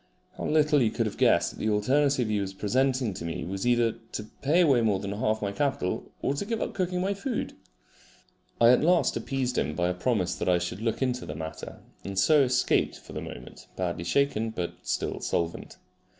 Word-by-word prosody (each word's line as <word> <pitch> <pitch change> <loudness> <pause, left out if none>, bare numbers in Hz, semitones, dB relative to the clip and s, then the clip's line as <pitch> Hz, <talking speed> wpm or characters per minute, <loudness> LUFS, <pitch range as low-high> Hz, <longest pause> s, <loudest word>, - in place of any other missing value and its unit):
How - - -5
little 150 -1 +3
he 115 -4 +3
could 115 +1 -1
have 110 - -3
guessed - - +4
that - - -13
the 110 - 0
alternative 130 +4 +2
he 105 -1 0
was 95 -1 -4
presenting 130 +2 +1
to 85 - -7
me 85 0 -4
was 95 +5 -3
either 120 -2 +3 0.2
to 105 - -3 0.2
pay 155 +6 +3
away 140 -8 +4
more 105 -4 +2
than 100 0 -4
half 110 +1 -1
my 100 - -1
capital, 130 -5 -2
or 135 - +1
to 145 - -3
give 225 +2 -2
up - - -3
cooking 180 -1 -1
my 195 +2 0
food! 230 +5 -3 1.1
I 115 - +7
at 125 - +4
last 175 +1 +3
appeased 130 -3 -1
him 75 - -2
by 90 +1 +1
a - - 0
promise 95 -1 0
that - - -2
I 90 - +4
should 90 +3 -4
look 115 +3 -1
into 125 -1 -2
the 75 - -5
matter, 80 +1 -7 0.2
and 100 0 -6
so 150 +9 +5
escaped 125 -1 +2
for - - -13
the - - -4
moment, - - -10
badly 85 -2 -2
shaken 115 +2 +1
but 90 -6 -4
still - - -2
solvent. 85 -1 -3
115 Hz, 210 wpm, -27 LUFS, 95-140 Hz, 1.1 s, I